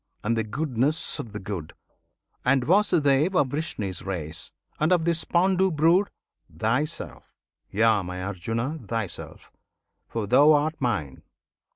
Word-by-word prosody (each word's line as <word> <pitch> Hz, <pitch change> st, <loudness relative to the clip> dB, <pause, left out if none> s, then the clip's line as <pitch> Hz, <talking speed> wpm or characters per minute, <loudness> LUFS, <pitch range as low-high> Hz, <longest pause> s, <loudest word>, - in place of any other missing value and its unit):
and 115 Hz, +2 st, +1 dB
the 115 Hz, -, 0 dB
goodness 140 Hz, +5 st, -1 dB
of 115 Hz, -, -6 dB
the 105 Hz, -, -6 dB
good, 95 Hz, -6 st, -6 dB, 0.7 s
And 130 Hz, 0 st, +3 dB
Vasudev 170 Hz, -2 st, +3 dB
of 140 Hz, -7 st, +3 dB
Vrishni's 110 Hz, -, -3 dB
race, 85 Hz, -5 st, -4 dB, 0.3 s
and 155 Hz, +3 st, +2 dB
of 175 Hz, -3 st, +3 dB
this 170 Hz, -1 st, +1 dB
Pandu 190 Hz, +2 st, +3 dB
brood 170 Hz, +5 st, +3 dB, 0.4 s
Thyself! 125 Hz, -, -3 dB, 0.3 s
Yea, 110 Hz, 0 st, +3 dB
my 90 Hz, 0 st, -5 dB
Arjuna! 115 Hz, -, -3 dB
thyself; 110 Hz, -4 st, -5 dB, 0.6 s
for 115 Hz, -2 st, -3 dB
thou 140 Hz, +8 st, +6 dB
art 150 Hz, +2 st, +2 dB
Mine! 100 Hz, -, -2 dB
125 Hz, 130 wpm, -25 LUFS, 105-160 Hz, 0.7 s, thou